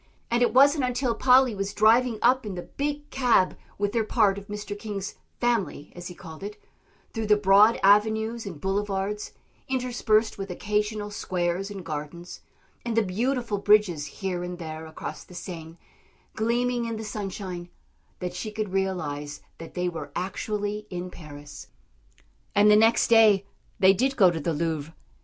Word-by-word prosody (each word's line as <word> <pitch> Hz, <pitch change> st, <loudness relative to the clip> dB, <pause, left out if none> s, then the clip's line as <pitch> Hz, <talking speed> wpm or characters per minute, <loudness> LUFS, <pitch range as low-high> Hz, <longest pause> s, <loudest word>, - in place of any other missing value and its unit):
And 235 Hz, +1 st, +2 dB
it 245 Hz, -, +4 dB
wasn't 280 Hz, +2 st, +5 dB
until 250 Hz, -1 st, 0 dB
Polly 255 Hz, +1 st, +5 dB
was 195 Hz, 0 st, -4 dB
driving 225 Hz, +2 st, +4 dB
up 255 Hz, +2 st, +4 dB
in 205 Hz, -4 st, -5 dB
the 175 Hz, -, -5 dB
big 290 Hz, +1 st, -4 dB
cab 245 Hz, -8 st, +3 dB, 0.2 s
with 205 Hz, 0 st, -1 dB
her 230 Hz, -2 st, +2 dB
part 210 Hz, -3 st, +2 dB
of 200 Hz, -, -15 dB
Mr. 205 Hz, 0 st, -5 dB
King's 205 Hz, -2 st, -5 dB, 0.3 s
"family," 230 Hz, -11 st, -1 dB
as 175 Hz, 0 st, -7 dB
he 180 Hz, -, -9 dB
called 160 Hz, -2 st, -11 dB
it, 205 Hz, +1 st, -7 dB, 0.5 s
through 225 Hz, -2 st, -3 dB
the 210 Hz, 0 st, +5 dB
broad 205 Hz, +3 st, +5 dB
avenues 220 Hz, +3 st, +3 dB
and 170 Hz, -6 st, -7 dB
boulevards, 195 Hz, +2 st, -2 dB, 0.4 s
interspersed 240 Hz, -5 st, +1 dB
with 195 Hz, 0 st, -5 dB
occasional 210 Hz, +2 st, -2 dB
squares 185 Hz, -1 st, -2 dB
and 195 Hz, -4 st, -8 dB
gardens, 155 Hz, +3 st, -6 dB, 0.4 s
and 235 Hz, -1 st, -2 dB
the 225 Hz, -, +5 dB
beautiful 230 Hz, +2 st, -1 dB
bridges 200 Hz, -8 st, +3 dB
here 180 Hz, +4 st, -4 dB
and 180 Hz, 0 st, -5 dB
there 160 Hz, -1 st, -7 dB
across 160 Hz, -, -7 dB
the 180 Hz, -, -15 dB
Seine, 165 Hz, -2 st, -8 dB, 0.6 s
gleaming 240 Hz, +2 st, 0 dB
in 230 Hz, -1 st, -3 dB
the 220 Hz, -, -5 dB
sunshine, 190 Hz, -4 st, -5 dB, 0.5 s
that 180 Hz, 0 st, -4 dB
she 185 Hz, +5 st, -4 dB
could 215 Hz, -1 st, -3 dB
realise 150 Hz, -7 st, -2 dB, 0.2 s
that 165 Hz, -, -10 dB
they 180 Hz, 0 st, 0 dB
were 170 Hz, -2 st, -5 dB
actually 205 Hz, +3 st, -3 dB
in 180 Hz, 0 st, -5 dB
Paris. 145 Hz, -3 st, -11 dB, 0.9 s
And 205 Hz, +1 st, +6 dB
the -, -, +7 dB
next 225 Hz, +2 st, +4 dB
day 215 Hz, -4 st, +5 dB, 0.3 s
they 190 Hz, -1 st, +6 dB
did 265 Hz, +7 st, 0 dB
go 185 Hz, -5 st, +6 dB
to 165 Hz, -, -3 dB
the 165 Hz, +2 st, -1 dB
Louvre. 160 Hz, 0 st, -3 dB
205 Hz, 165 wpm, -26 LUFS, 180-225 Hz, 0.9 s, the